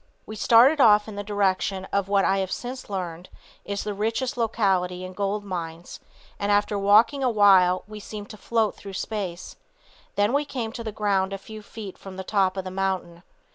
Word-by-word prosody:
We 215 - -8
started 245 +7 +5
off 210 -3 +6
in 215 - -8
the 205 - -4
direction 195 -2 0
of 200 -1 +1
what 200 -1 +2
I 195 0 +2
have 190 -1 -2
since 250 0 -6
learned 180 -3 -5 0.3
is 200 0 -4
the 210 - -3
richest 225 +5 -1
locality 190 -6 0
in 185 - -8
gold 200 +2 -2
mines 170 -3 -6 0.4
and 200 0 0
after 205 0 +2
walking 215 +8 +4
a 255 - +3
while 190 -4 +5
we 215 0 -9
seemed 205 0 -8
to - - -9
float 225 -1 0
through 200 -1 -10
space; 190 -3 -5 0.6
then 205 +4 +2
we 285 +1 +2
came 250 -6 -4
to 235 -1 -7
the 220 - -4
ground 200 -2 0
a - - -3
few 215 +2 -10
feet 210 -2 -9
from 190 -1 -10
the 190 - -5
top 195 -1 +1
of 190 - -2
the 185 - -6
mountain. 185 -3 -2
205 Hz, 200 wpm, -25 LUFS, 190-220 Hz, 0.6 s, off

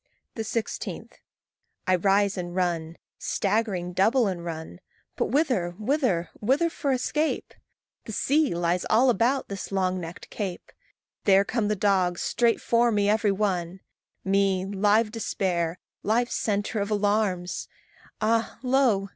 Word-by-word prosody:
16. 225 0 -4 0.8
I 185 - +3
rise 195 +2 +2
and 175 -2 -5
run, 170 -3 -1 0.2
staggering 195 -4 -1
double 225 +7 +3
and 185 -4 -2
run. 160 - -6 0.4
But - - 0
whither? 235 - +1
whither? 215 - 0
whither 275 +10 +2
for 285 -4 -1
escape? 300 +5 -1 0.5
The - - -6
sea 285 - +1
lies 175 +1 0
all 245 +4 +5
about 245 +5 +1
this 200 0 -6
long 185 -1 0
necked 170 0 -9
cape 190 -5 -5 0.5
There 195 0 +5
come 220 0 -1
the 210 - +1
dogs, 185 -3 +1
straight 235 -1 +2
for 235 0 +2
me 205 -1 +2
every 215 -1 +2
one 190 -3 -1 0.4
Me, 195 -1 +2
live 205 +3 +2
despair, 180 -6 -1 0.2
live 240 +3 +1
centre 205 +1 -1
of 200 +1 -2
alarms! 205 -3 0 0.5
Ah! 225 +1 +1
lo! 250 -7 +2
200 Hz, 130 wpm, -26 LUFS, 185-230 Hz, 0.8 s, all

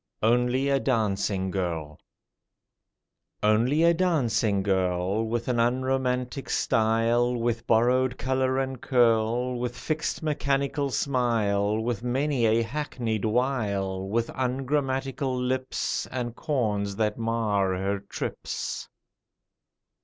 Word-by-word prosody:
ONLY 125 +4 +2
A 140 -1 +2
DANCING 100 -6 0
GIRL 85 -5 -3 1.4
ONLY 120 +9 +3
a 170 0 +6
dancing 120 - +1
girl, 95 +1 0
With 120 +1 -2
an 125 -2 +1
unromantic 125 +1 0
style, 115 +1 +2
With 115 0 -2
borrowed 125 +3 +3
colour 130 0 0
and 130 -2 -2
curl, 120 0 +2
With 120 0 -3
fixed 155 +5 -2
mechanical 140 -1 0
smile, 110 -6 +1
With 115 -1 -2
many 125 0 +1
a 115 +1 +3
hackneyed 115 -4 -3
wile, 105 -6 0
With 115 +2 0
ungrammatical 135 0 -1
lips, 130 +1 -1
And 120 -2 -4
corns 105 -9 -1
that 105 +1 -1
mar 105 -4 0
her 100 +1 -1
trips. 100 - -5
120 Hz, 105 wpm, -26 LUFS, 110-130 Hz, 1.4 s, a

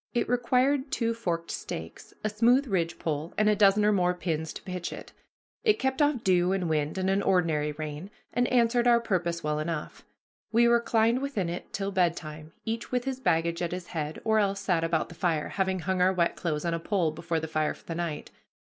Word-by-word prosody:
It 240 - +1
required 255 +3 +2
two 230 -1 0
forked 170 -7 -3
stakes, - - -7
a 215 - +1
smooth 240 +6 +3
ridgepole, 165 - -2
and 215 - +3
a 210 - +4
dozen 205 0 +4
or 210 - +5
more 180 -3 +2
pins 160 -3 -2
to - - -9
pitch 180 -2 -4
it. - - -9 0.5
It 430 -3 +4
kept 265 +3 0
off 290 -5 +2
dew 180 0 +3
and 185 -3 -1
wind 155 +1 -1
and 190 0 0
an 195 +1 +2
ordinary 165 -6 +1
rain, 155 +4 -6 0.2
and 245 +1 +2
answered 240 0 +3
our 235 -1 +6
purpose 175 -7 -1
well 150 0 0
enough. 155 0 -4 0.5
We 235 +1 +5
reclined 235 0 +3
within 255 -11 -2
it 175 - -6
till 200 0 -2
bedtime, 160 -4 -1
each 225 0 -3
with 250 -1 0
his 265 -1 -3
baggage 170 -6 +1
at 175 0 -2
his 180 -1 -5
head, 155 -2 -4
or 220 -1 +3
else 200 -1 +1
sat 170 -4 +1
about 165 -1 0
the - - -10
fire, 165 -3 -1
having 190 -2 -1
hung 185 +2 -1
our 185 +1 +5
wet 170 -2 +1
clothes 155 -3 -2
on 170 - 0
a 165 - -1
pole 175 -2 0
before 165 +1 -2
the 160 - -4
fire 155 -1 0
for - - -21
the 165 - -4
night. 165 -3 -4
185 Hz, 210 wpm, -28 LUFS, 165-230 Hz, 0.5 s, our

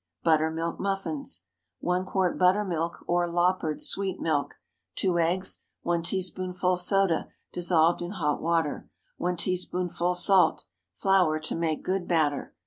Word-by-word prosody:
BUTTERMILK 160 +1 +1
MUFFINS. 200 +9 -2 0.4
1 180 +1 0
quart 185 -2 0
buttermilk, 180 -3 +1
or 175 0 +1
"loppered" 175 -2 0
sweet 195 -2 -1
milk. 150 -3 -1 0.4
2 180 -3 +1
eggs. 180 +3 0 0.2
1 170 0 0
teaspoonful 185 0 -1
soda, 185 -1 +2 0.3
dissolved 170 -1 +3
in 175 - -4
hot 150 -6 -1
water. 165 -2 -1 0.3
1 180 0 -1
teaspoonful 180 0 -1
salt. 180 -2 +4 0.3
Flour 180 - +3
to - - -2
make 165 -2 -1
good 185 -1 -1
batter. 155 -4 0
175 Hz, 125 wpm, -27 LUFS, 165-185 Hz, 0.4 s, salt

